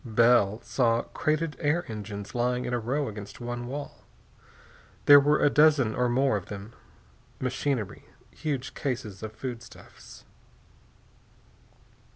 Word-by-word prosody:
Bell 115 -3 +3
saw 115 -2 +1
crated 155 0 -1
air 160 +3 +1
engines 105 -2 -7
lying 125 +1 0
in 125 - -3
a 120 - +1
row 135 +5 -1
against 105 -1 -8
one 120 0 -5
wall. 140 +3 -6 1.1
There 145 0 +10
were 145 +2 +2
a - - +6
dozen 150 -7 +4
or 125 +1 +1
more 130 -2 +2
of 95 - -8
them. 105 +2 -8 0.7
Machinery, 130 -4 -2 0.3
huge 140 -4 -4
cases 120 -9 -4
of 110 0 -5
foodstuffs.... 120 +1 -10
125 Hz, 125 wpm, -27 LUFS, 110-140 Hz, 1.1 s, There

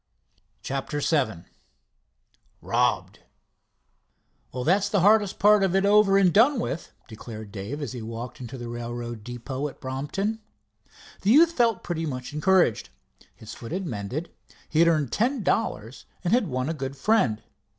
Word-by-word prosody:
CHAPTER 135 +2 -3
VII 140 - 0 1.2
ROBBED - - 0 1.3
"Well 125 0 -4
that's 195 +7 +2
the 200 -3 +2
hardest 205 0 +4
part 210 0 +5
of 190 -1 +1
it 195 +1 +3
over 200 -1 +5
and 185 -4 +4
done 250 +5 +5
with," 170 - -4 0.2
declared 110 -1 -9
Dave, 110 +9 -5
as - - -4
he 125 - -6
walked 115 +3 -7
into 125 +1 -7
the 120 -1 -7
railroad 120 -1 -6
depot 125 +4 -5
at 140 - -11
Brompton. 145 +12 -3 0.8
The 195 - 0
youth 320 +8 +6
felt 235 - +1
pretty 165 -2 -3
much 130 0 -5
encouraged. 175 - +2 0.5
His 110 - -10
foot 115 - -9
had 190 +2 -3
mended, 125 - -5 0.4
he 155 - -1
had 170 - +6
earned 155 -7 +1
ten 240 - 0
dollars, 120 - -2 0.2
and 180 +3 +1
had 240 -5 +3
won 130 -2 -2
a 160 - -1
good 135 -3 -5
friend. 130 - +1
150 Hz, 155 wpm, -25 LUFS, 120-195 Hz, 1.3 s, youth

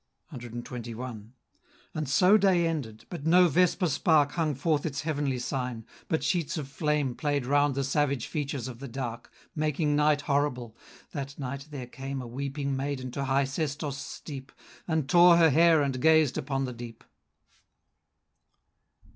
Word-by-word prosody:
CXXI. 120 -2 -7 0.7
And 155 -3 -3
so 180 +8 +5
day 190 -4 +4
ended. 135 -10 -4
But 160 -4 -5
no 180 +2 +6
vesper 180 +3 +2
spark 150 -1 +3
Hung 155 -3 -1
forth 150 +2 0
its 145 -2 -3
heavenly 145 -4 -1
sign; 125 -3 -4 0.2
but 160 - -1
sheets 170 -3 0
of 145 -3 -4
flame 150 -2 -1
Play'd 145 -1 -1
round 145 +1 +2
the 140 - 0
savage 140 -2 0
features 140 -4 -3
of 120 -2 -8
the 140 - -7
dark, 120 -2 -6 0.2
Making 150 -1 0
night 150 0 +3
horrible. 140 -6 -1 0.4
That 140 -1 -6
night, 140 +1 -5
there 140 -4 -6
came 135 +2 -6
A 125 - -6
weeping 140 +3 -3
maiden 135 -2 -3
to 140 +2 -3
high 135 +1 +2
Sestos' 140 0 -3
steep, 135 -2 -8 0.4
And 160 -5 0
tore 175 +2 +7
her 165 -2 +5
hair 165 0 +5
and 135 -2 -2
gazed 155 -4 +4
upon 135 0 -2
the 125 - -5
deep. 120 -1 -10
140 Hz, 155 wpm, -28 LUFS, 130-155 Hz, 0.7 s, tore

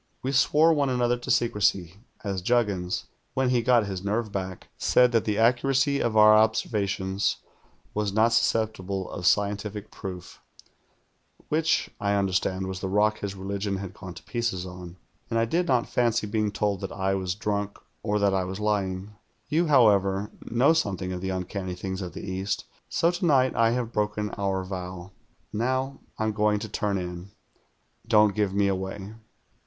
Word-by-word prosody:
"We 130 - -1
swore 150 +4 +4
one 145 -3 +1
another 120 -1 +2
to 120 - -9
secrecy 100 -6 +1 0.3
as 100 -3 -2
Juggins, 100 -5 0 0.3
when 130 -1 +2
he 125 -2 +3
got 120 -2 +4
his 95 -2 -5
nerve 105 +2 -1
back, 95 -2 -5
said 125 -1 +4
that 115 -2 +2
the 105 -1 0
accuracy 135 +4 +3
of 110 -2 0
our 110 0 +8
observations 100 -3 +1 0.6
was 105 -1 -1
not 110 +3 +3
susceptible 100 -5 0
of 90 -2 -2
scientific 105 0 0
proof, 90 -3 -8 1.1
which, 160 +1 +1
I 100 0 +1
understand, 95 -1 0
was 95 0 -5
the 95 - -3
rock 105 +2 +2
his 100 -1 -4
religion 100 +1 -3
had 95 -1 -6
gone 90 -3 -9
to - - -11
pieces 115 -7 -2
on; 90 -1 -9 0.3
and 115 - 0
I 115 - +3
did 175 +9 0
not 125 -4 +2
fancy 120 -2 +1
being 105 0 0
told 100 -2 -1
that - - -4
I 95 0 -1
was 95 -2 -2
drunk 105 -1 -2 0.2
or 105 -1 0
that 100 -1 +2
I 95 -1 +1
was 95 +2 -5
lying. 100 -2 -1 0.4
You, 165 +3 +2
however, 105 -7 +4 0.2
know 125 +7 +4
something 95 - -1
of 90 - -5
the 95 - -3
uncanny 95 0 -4
things 95 +1 -4
of 90 -2 -6
the - - -7
East, 95 +2 -2 0.2
so 170 - +2
to 175 +1 -5
night 130 -4 +3
I 115 -1 +4
have 120 -1 -2
broken 105 0 -1
our 95 -1 -1
vow. 90 -1 -6 0.4
Now 130 +5 -1 0.2
I'm 110 0 0
going 105 0 +2
to 110 - -5
turn 100 0 -1
in. 90 +1 -6 0.8
Don't 105 -2 +5
give 105 -2 0
me 100 0 +3
away." 95 +1 -3
105 Hz, 170 wpm, -26 LUFS, 95-115 Hz, 1.1 s, our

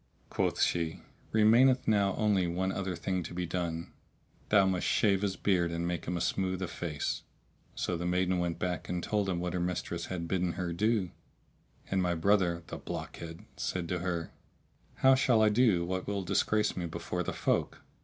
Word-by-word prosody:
Quoth - - 0
she 85 -2 0 0.3
"Remaineth 120 +4 +5
now 100 -3 +3
only 100 -4 +2
one 95 +3 -1
other 95 -2 -3
thing 90 +2 -2
to 85 - -7
be 90 0 -1
done; 85 -1 -3 0.6
thou 100 -2 +5
must 95 -1 0
shave 100 -3 +3
his 100 -2 0
beard 90 -4 +1
and 85 +1 -2
make 85 -1 -3
him 90 +1 -2
a - - -3
smooth 95 -1 0
o' - - -2
face."[FN#646] 80 -4 -6
So 90 - 0
the 90 +1 -3
maiden 90 0 +1
went 85 -1 -1
back 90 -1 -3
and 90 -1 -2
told 105 -2 0
him 90 -2 -1
what 90 0 -2
her 90 - -1
mistress 85 -1 -2
had 85 -2 -4
bidden 90 -1 0
her 90 -1 -3
do; 105 -1 +1 0.8
and 95 -1 +2
my 90 -1 +1
brother 85 -1 +2
(the - - -7
blockhead!) 80 0 -7
said 90 -2 -2
to 90 - -1
her, 85 -2 -3 0.6
"How 135 0 +5
shall 130 -4 +4
I 110 - +6
do 105 -6 +3
what 95 +1 -3
will 100 -1 -1
disgrace 105 +3 +1
me 85 -1 -3
before 80 - -4
the - - -2
folk?" - - -1
90 Hz, 190 wpm, -31 LUFS, 85-100 Hz, 0.8 s, I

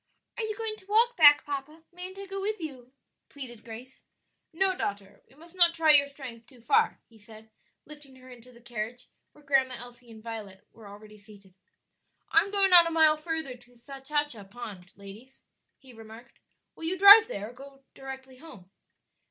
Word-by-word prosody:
"Are 465 - -4
you 435 -1 -4
going 445 -2 -4
to 380 - -21
walk 460 +4 +2
back, 290 -4 +6
papa? 290 +3 -7
Mayn't 365 +2 -9
I 395 - -8
go 390 0 -7
with 425 +1 -3
you?" 260 -6 -9 0.4
pleaded 245 -5 -11
Grace. 235 +3 -12 0.5
"No, 375 +3 0
daughter, 200 - -6
we 265 - -23
must 335 +4 -17
not 345 -2 +4
try 320 -2 +4
your 285 -1 +5
strength 255 -5 -11
too 255 -3 -19
far," 230 - 0
he 225 -1 -22
said, 220 0 -16 0.3
lifting 295 -3 -14
her 255 0 -17
into 250 0 -15
the 235 -1 -19
carriage 240 +1 -7 0.2
where 295 - -21
Grandma 265 -2 +1
Elsie 245 0 -13
and 220 -1 -14
Violet 215 -5 -9
were 220 -2 -16
already 210 +1 -14
seated. 200 -2 -19 0.8
"I - - +5
am 395 - -6
going 395 -2 +2
on 345 -1 +9
a - - -1
mile 315 -2 +4
further 310 -4 -5
to 245 0 -23
Sachacha 275 -2 -4
Pond, 200 -5 -10
ladies," 210 +7 -15 0.3
he 260 -2 -18
remarked; 225 +1 -15 0.4
"will 325 - -8
you 360 +3 -2
drive 405 +3 +9
there, 210 +4 -7
or 275 +1 -15
directly 265 -1 -11
home?" 225 - -15
265 Hz, 185 wpm, -27 LUFS, 230-325 Hz, 0.8 s, on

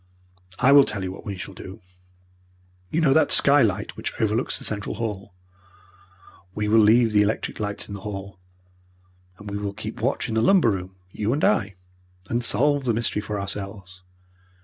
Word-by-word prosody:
I 135 - +4
will 140 0 +8
tell 105 -6 -3
you 95 - -3
what 95 - -11
we 100 -2 -4
shall 90 +2 -8
do. 95 +3 -10 1.1
You 165 - 0
know 145 -4 +4
that 160 - +3
skylight 115 -9 +4
which - - -5
overlooks 110 +2 0
the - - -9
central 105 -1 -4
hall? 100 -4 -5 1.2
We 105 0 -2
will 110 +2 +4
leave 110 +2 +5
the 105 -1 +4
electric 105 +2 -1
lights 100 -1 -3
in - - -8
the 100 - -7
hall, 95 -2 -7 1.0
and 105 - -12
we 100 - -3
will 100 -1 -4
keep - - -7
watch - - -1
in - - -4
the 110 - +1
lumber 170 - +4
room, 95 -1 -5 0.2
you 105 +5 -1
and 145 - -2
I, 100 -2 +1 0.6
and 120 +1 0
solve 140 +5 +1
the 120 -3 +1
mystery 115 -2 -1
for 105 -1 -4
ourselves. 95 -1 -7
105 Hz, 180 wpm, -24 LUFS, 100-115 Hz, 1.2 s, will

